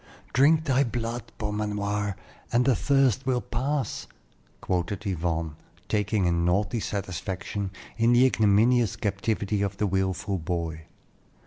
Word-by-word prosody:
"Drink 155 +5 +5
thy 140 -2 +3
blood, 120 -1 -4
Beaumanoir, 105 -1 -2 0.4
and 120 +1 +3
the 130 -2 +4
thirst 135 0 +2
will 125 -2 +2
pass," 130 +1 -2 0.5
quoted 95 +3 -2
Yvonne, 80 -4 -2 0.3
taking 105 -1 +1
a 85 - +3
naughty 90 +7 +1
satisfaction 95 0 -3 0.3
in 115 +1 +4
the 120 +2 +6
ignominious 115 -1 +3
captivity 105 0 -1
of 100 -1 -1
the 105 - +1
wilful 95 0 -1
boy. 80 -2 -3
105 Hz, 120 wpm, -27 LUFS, 95-120 Hz, 0.5 s, the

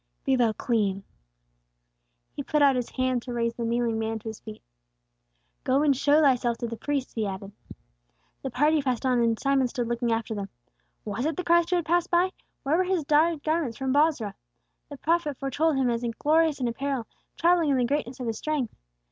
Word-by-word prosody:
Be 270 - +3
thou 240 -3 +3
clean!" 205 -4 -1 1.3
He - - -3
put 300 +1 +1
out 275 -2 +5
His 245 -2 -2
hand 255 -1 0
to 245 - -7
raise 235 -1 0
the 235 - -5
kneeling 230 -1 0
man 225 0 -2
to 220 +1 -7
his 220 - -8
feet. 215 -1 -11 1.0
"Go 270 +3 +2
and 285 -2 +4
show 290 +3 +3
thyself 250 -5 +2
to 235 - -3
the 230 - -5
priests," 280 +2 -3
He 220 -3 -1
added. 195 +1 -6 0.9
The 270 - -3
party 295 +5 +2
passed 255 -2 -2
on, 250 -2 +2
and 230 -1 +1
Simon 275 -2 +2
stood 245 -1 -3
looking 235 0 -1
after 225 0 -1
them. 200 -2 -5 0.6
Was 225 +7 -2
it 315 - -3
the 365 - -2
Christ 340 -1 +3
who 360 - +2
had 345 -2 0
passed 345 +1 +1
by? 355 +2 +2 0.3
Where 290 +4 +2
were 370 - +3
His 365 -3 0
dyed 305 +1 +2
garments 310 -7 -1
from 265 -1 -1
Bozrah? 285 -9 +2 0.6
The 285 - -8
prophet 315 -2 0
foretold 290 +3 0
Him 255 -2 +2
as 235 0 -2
glorious 315 0 +2
in 250 - 0
apparel, 265 0 -2 0.3
travelling 340 -2 +3
in 275 - +3
the 250 - +2
greatness 270 -1 -2
of 250 - -4
His 225 -2 -3
strength. 300 -6 -2
265 Hz, 205 wpm, -26 LUFS, 235-300 Hz, 1.3 s, out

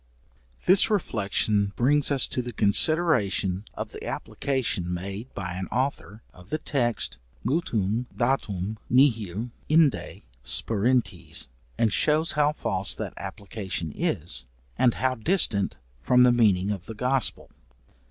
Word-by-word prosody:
This 190 +4 +6
reflection 105 - 0
brings 145 +4 +3
us 140 -3 +3
to 125 - -1
the 120 0 -5
consideration 105 - +2
of - - -5
the - - -9
application 115 -10 -1
made 100 +7 -5
by 90 -3 -4
an 95 +1 -4
author, 120 -4 -3
of 90 +1 -16
the 155 - -1
text, 120 - -1 0.3
mutuum 120 - 0
date 130 +1 +1 0.4
nihil 115 -4 +2 0.2
inde 155 -2 +2 0.2
sperantes, 115 - 0 0.3
and 110 -3 +2
shews 155 +2 +2
how 150 0 +2
false 100 -9 -1
that 110 -4 -5
application 95 -4 -5
is, 65 +1 -1 0.3
and 125 -3 +3
how 130 +1 +1
distant 115 - 0 0.2
from 125 0 +5
the 125 - +6
meaning 105 -5 +3
of 95 -3 -5
the 115 - -7
Gospel. 125 +1 -1
115 Hz, 125 wpm, -26 LUFS, 100-135 Hz, 0.4 s, This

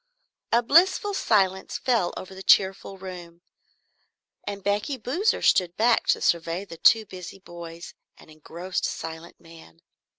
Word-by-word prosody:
A 235 +1 +3
blissful 370 - +4
silence 195 - +1
fell 240 -7 0
over 185 - -8
the 190 - -10
cheerful 195 0 +2
room 175 -2 -10 1.0
and 200 -1 -6
Becky 205 +7 -1
Boozer 310 - 0
stood 180 -1 +2
back 235 +1 +2
to - - +2
survey 170 +3 0
the 165 -4 -11
two 220 +6 +5
busy 185 -1 -10
boys 170 -2 -10 0.2
and - - -17
engrossed 170 +4 -5
silent 165 +1 -7
man. 165 - -17
190 Hz, 135 wpm, -25 LUFS, 170-220 Hz, 1.0 s, two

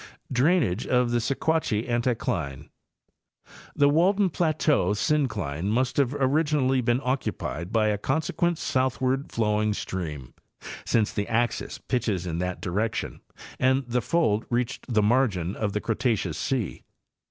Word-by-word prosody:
Drainage 130 - +2
of 125 -1 +2
the 120 - +2
Sequatchie 135 -2 0
Anticline—The 115 - -3
Walden 185 +6 +3
plateau 150 - +1
syn 150 +5 +2
cline 95 - -3
must 125 +5 +1
originally 140 0 +2
have 125 - -2
been 120 +2 +2
occupied 115 - -3
by 110 -2 +2
a 105 -1 -1
consequent 160 +6 0
south 130 -7 0
ward 130 +2 -1
flowing 105 -1 +1
stream, 75 -11 -5 0.5
since 110 -2 +1
the 100 -1 -2
axis 120 +1 -1
pitches 105 -8 -2
in 85 -1 -3
that 90 0 -3
direction 105 +5 -2 0.4
and 130 +1 +2
the 120 +1 0
fold 115 -9 +1
reached 120 +1 -2
the 110 -2 +3
margin 105 -6 +1
of 105 -2 -2
the 105 - 0
Cretaceous 110 - 0
sea. 115 - -2
120 Hz, 130 wpm, -26 LUFS, 105-135 Hz, 0.5 s, Walden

